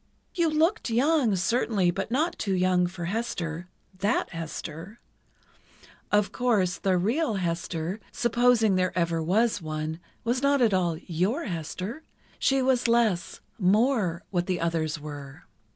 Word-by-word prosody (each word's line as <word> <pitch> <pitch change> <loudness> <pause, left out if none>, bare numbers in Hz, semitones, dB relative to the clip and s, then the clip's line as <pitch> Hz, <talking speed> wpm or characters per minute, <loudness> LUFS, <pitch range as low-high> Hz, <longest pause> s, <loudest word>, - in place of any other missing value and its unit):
"You 340 -3 +2
looked 325 - +1
young, 250 -1 +3
certainly, 190 -1 +1
but 175 - -4
not 315 +8 0
too 195 -3 0
young 180 -1 +2
for 175 -1 -6
Hester—that 185 -1 -3
Hester. 165 +4 -7 1.1
Of 210 -1 +3
course, 205 -8 +1
the 190 -2 +2
real 230 - 0
Hester—supposing 195 +6 +1
there 185 -1 0
ever 170 -1 +1
was 205 +5 +1
one—was 160 +10 -4
not 280 0 +3
at 230 -5 +3
all 175 -3 +1
your 185 - -1
Hester. 185 - -5 0.4
She 270 -1 +2
was 255 -2 +2
less—more—what 205 -3 +1
the 185 -2 0
others 165 -2 -1
were." 145 -2 -9
190 Hz, 120 wpm, -27 LUFS, 170-235 Hz, 1.1 s, young